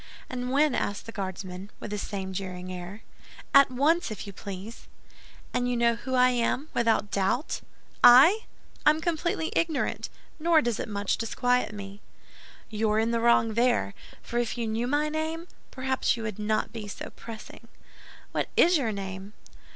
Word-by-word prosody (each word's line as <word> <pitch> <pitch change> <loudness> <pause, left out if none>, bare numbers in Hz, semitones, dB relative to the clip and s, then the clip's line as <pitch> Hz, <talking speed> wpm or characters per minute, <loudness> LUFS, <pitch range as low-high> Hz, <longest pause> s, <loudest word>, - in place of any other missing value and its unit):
"And 250 0 -3
when?" 290 +1 +3
asked 205 -3 -2
the 230 - -7
Guardsman, 190 -1 -6
with 210 - -7
the 210 - -2
same 190 -2 -4
jeering 185 -1 -5
air. 180 +4 -8 0.5
"At 275 0 +8
once, 295 +7 +2
if 215 - -6
you 200 - -8
please." 200 +4 -8 0.7
"And 245 0 0
you 245 - 0
know 235 0 +4
who 260 +3 -4
I 250 0 +6
am, 250 +5 0
without 225 -3 +1
doubt?" 200 - 0 0.4
"I? 310 - +8 0.4
I - - +7
am 305 +1 +3
completely 325 0 -1
ignorant; 325 -3 0 0.3
nor 330 0 +4
does 240 -7 -1
it - - -4
much 200 -1 -1
disquiet 245 +1 0
me." 200 0 -9 0.7
"You're 215 0 +1
in 225 +1 +2
the 230 - +1
wrong 230 -1 +3
there; 235 -2 +2 0.3
for 240 - -2
if 240 0 -2
you 235 - -1
knew 225 +2 -1
my 290 +3 +1
name, 315 +2 -3 0.2
perhaps 260 -2 0
you 225 - -5
would 215 -2 -4
not 215 0 -1
be 220 -3 -6
so 205 - -7
pressing." 225 -1 -11 0.6
"What - - -1
is 350 0 +6
your 235 -5 0
name?" 195 0 -6
230 Hz, 170 wpm, -27 LUFS, 205-265 Hz, 0.7 s, At